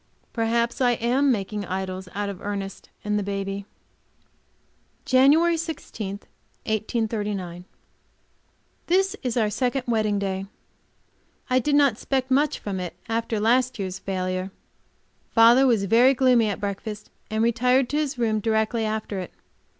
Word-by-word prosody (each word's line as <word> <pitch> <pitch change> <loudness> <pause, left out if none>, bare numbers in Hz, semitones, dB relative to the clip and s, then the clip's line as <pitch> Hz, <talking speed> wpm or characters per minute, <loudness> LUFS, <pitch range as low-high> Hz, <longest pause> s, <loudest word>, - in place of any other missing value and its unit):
Perhaps 235 +1 0
I 245 -1 +4
am 255 +4 +2
making 205 -2 -2
idols 185 0 -4
out 205 0 -2
of 200 -3 -6
Ernest 200 -1 -5 0.2
and 210 0 +1
the - - -1
baby. 195 0 -4 1.4
JANUARY 300 +6 +5
16, 225 - -5 0.4
1839. 210 -5 -2 1.2
This 380 +2 +2
is 250 -2 -2
our 215 -3 +2
second 255 +3 -1
wedding 215 -3 +1
day. 195 -1 -3 1.0
I 255 - +5
did 285 +3 +1
not 285 -4 +5
expect 260 +3 -2
much 285 +2 +2
from 195 -2 -4
it, 180 -1 -5
after 225 -1 -1
last 245 +4 +2
year's 190 -2 -4
failure. 185 -1 -3 0.9
Father 240 +4 +7
was 225 -5 +3
very 245 +6 +5
gloomy 250 -4 +4
at 200 - -3
breakfast, 205 +1 -5 0.2
and 220 +1 0
retired 250 +3 +3
to 295 - -1
his 300 -3 -1
room 220 -3 +1
directly 220 +1 0
after 215 -2 -3
it. 180 - -6
220 Hz, 135 wpm, -24 LUFS, 200-255 Hz, 1.4 s, Father